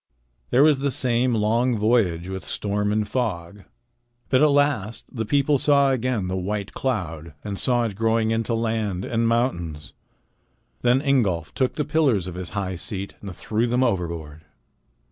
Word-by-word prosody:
There 130 Hz, +3 st, +5 dB
was 150 Hz, -3 st, +4 dB
the 140 Hz, +1 st, 0 dB
same 125 Hz, -2 st, +1 dB
long 115 Hz, +3 st, +1 dB
voyage 105 Hz, -6 st, +1 dB
with 95 Hz, 0 st, -5 dB
storm 105 Hz, 0 st, -1 dB
and 105 Hz, 0 st, 0 dB
fog. 100 Hz, -5 st, -3 dB, 0.6 s
But 130 Hz, -, +3 dB
at 150 Hz, -, +6 dB
last 140 Hz, -7 st, +1 dB
the 110 Hz, -2 st, -3 dB
people 140 Hz, +3 st, +2 dB
saw 140 Hz, -1 st, +4 dB
again 125 Hz, -6 st, -1 dB
the 95 Hz, -, -2 dB
white 100 Hz, +2 st, -3 dB
cloud 85 Hz, -, -3 dB
and 100 Hz, -2 st, -5 dB
saw 120 Hz, -2 st, +2 dB
it 110 Hz, -4 st, -3 dB
growing 115 Hz, +1 st, +1 dB
into 115 Hz, +1 st, 0 dB
land 110 Hz, -5 st, -1 dB
and 115 Hz, 0 st, 0 dB
mountains. 85 Hz, -, -1 dB, 0.9 s
Then 125 Hz, +3 st, +3 dB
Ingolf 100 Hz, -, +1 dB
took 130 Hz, -1 st, 0 dB
the 150 Hz, -, -1 dB
pillars 145 Hz, -, +2 dB
of 90 Hz, -, -6 dB
his 90 Hz, 0 st, -6 dB
high 95 Hz, -2 st, -2 dB
seat 100 Hz, +2 st, -6 dB
and 100 Hz, -3 st, -7 dB
threw 110 Hz, +6 st, -1 dB
them 125 Hz, +2 st, +2 dB
overboard. 85 Hz, -, -2 dB
110 Hz, 165 wpm, -23 LUFS, 95-125 Hz, 0.9 s, at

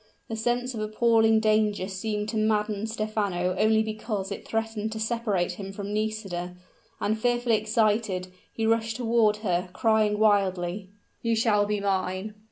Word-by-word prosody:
The 225 Hz, -, -3 dB
sense 245 Hz, +3 st, -1 dB
of 225 Hz, -, -5 dB
appalling 220 Hz, +1 st, +3 dB
danger 215 Hz, -3 st, +2 dB
seemed 210 Hz, +2 st, -3 dB
to 225 Hz, -, -4 dB
madden 215 Hz, 0 st, 0 dB
Stephano 205 Hz, -5 st, -1 dB
only 220 Hz, 0 st, +4 dB
because 215 Hz, -2 st, -4 dB
it 200 Hz, -, -6 dB
threatened 220 Hz, -1 st, -2 dB
to 220 Hz, -, -5 dB
separate 220 Hz, -6 st, 0 dB
him 195 Hz, +2 st, -7 dB
from 200 Hz, +1 st, -5 dB
Nisida; 205 Hz, -5 st, -3 dB, 0.4 s
and, 215 Hz, +1 st, 0 dB
fearfully 240 Hz, -1 st, +2 dB
excited, 210 Hz, -3 st, 0 dB, 0.2 s
he 225 Hz, -, -2 dB
rushed 225 Hz, 0 st, +1 dB
toward 225 Hz, -3 st, +2 dB
her, 180 Hz, -1 st, 0 dB
crying 215 Hz, -1 st, +2 dB
wildly, 195 Hz, -3 st, +1 dB, 0.3 s
"You 230 Hz, -1 st, +1 dB
shall 210 Hz, -2 st, +2 dB
be 210 Hz, 0 st, 0 dB
mine!" 190 Hz, +1 st, -1 dB
215 Hz, 150 wpm, -26 LUFS, 200-225 Hz, 0.4 s, only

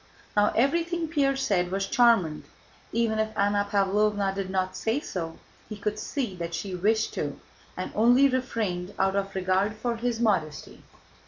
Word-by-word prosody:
Now 205 Hz, 0 st, +4 dB
everything 335 Hz, +7 st, +1 dB
Pierre 280 Hz, -4 st, +1 dB
said 195 Hz, -10 st, 0 dB
was 195 Hz, +1 st, -1 dB
charmant. 190 Hz, -10 st, +3 dB, 0.5 s
Even 225 Hz, -1 st, +1 dB
if 220 Hz, 0 st, -2 dB
Anna 205 Hz, 0 st, +2 dB
Pávlovna 200 Hz, 0 st, +2 dB
did 195 Hz, -1 st, -4 dB
not 185 Hz, -1 st, -1 dB
say 225 Hz, +5 st, 0 dB
so, 165 Hz, -, -5 dB, 0.3 s
he 215 Hz, -, -6 dB
could 210 Hz, +1 st, -3 dB
see 240 Hz, -4 st, -3 dB
that 170 Hz, -1 st, -4 dB
she 195 Hz, -2 st, -4 dB
wished 215 Hz, +5 st, +1 dB
to -, -, -4 dB, 0.4 s
and -, -, -4 dB
only 245 Hz, +5 st, +5 dB
refrained 220 Hz, -8 st, -2 dB
out 190 Hz, 0 st, +1 dB
of 195 Hz, 0 st, -2 dB
regard 190 Hz, +3 st, +1 dB
for 235 Hz, +2 st, -2 dB
his 235 Hz, 0 st, -2 dB
modesty. 185 Hz, -10 st, -1 dB
210 Hz, 160 wpm, -27 LUFS, 190-235 Hz, 0.5 s, only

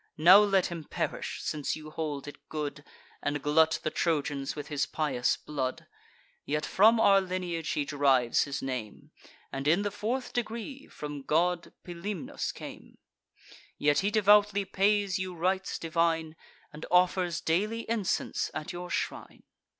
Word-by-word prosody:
Now 170 Hz, +6 st, +9 dB
let 195 Hz, -3 st, +3 dB
him 170 Hz, -3 st, -5 dB
perish, -, -, -4 dB
since 150 Hz, -2 st, -2 dB
you 155 Hz, 0 st, -10 dB
hold 150 Hz, -3 st, -4 dB
it 145 Hz, -, -12 dB
good, 150 Hz, -2 st, -4 dB, 0.4 s
And 145 Hz, +1 st, -1 dB
glut 160 Hz, +3 st, +3 dB
the 155 Hz, -, -1 dB
Trojans 145 Hz, -4 st, -1 dB
with 145 Hz, -, -6 dB
his 145 Hz, -2 st, 0 dB
pious 135 Hz, -6 st, 0 dB
blood. 135 Hz, -4 st, -4 dB, 0.6 s
Yet 150 Hz, +1 st, -1 dB
from 220 Hz, +4 st, +5 dB
our 200 Hz, -3 st, +6 dB
lineage 180 Hz, -4 st, -3 dB
he 150 Hz, -1 st, 0 dB
derives 135 Hz, -4 st, +3 dB
his 140 Hz, -1 st, -4 dB
name, 125 Hz, -5 st, -5 dB, 0.4 s
And, 135 Hz, +1 st, -3 dB
in 170 Hz, +6 st, +4 dB
the 205 Hz, -, -1 dB
fourth 225 Hz, +6 st, -3 dB
degree, 240 Hz, +4 st, -4 dB
from 145 Hz, -1 st, -7 dB
god 170 Hz, +4 st, 0 dB
Pilumnus 175 Hz, +1 st, -4 dB
came; -, -, -11 dB, 0.8 s
Yet 145 Hz, 0 st, +3 dB
he 200 Hz, -, +1 dB
devoutly 205 Hz, -1 st, +4 dB
pays 195 Hz, 0 st, +1 dB
you 185 Hz, -1 st, -4 dB
rites 185 Hz, +3 st, -1 dB
divine, 165 Hz, -1 st, 0 dB, 0.4 s
And 150 Hz, -, -8 dB
offers 180 Hz, -1 st, +3 dB
daily 210 Hz, +8 st, 0 dB
incense 220 Hz, -4 st, -1 dB
at 155 Hz, +3 st, -4 dB
your 175 Hz, 0 st, -6 dB
shrine." -, -, -4 dB
165 Hz, 145 wpm, -29 LUFS, 150-195 Hz, 0.8 s, Now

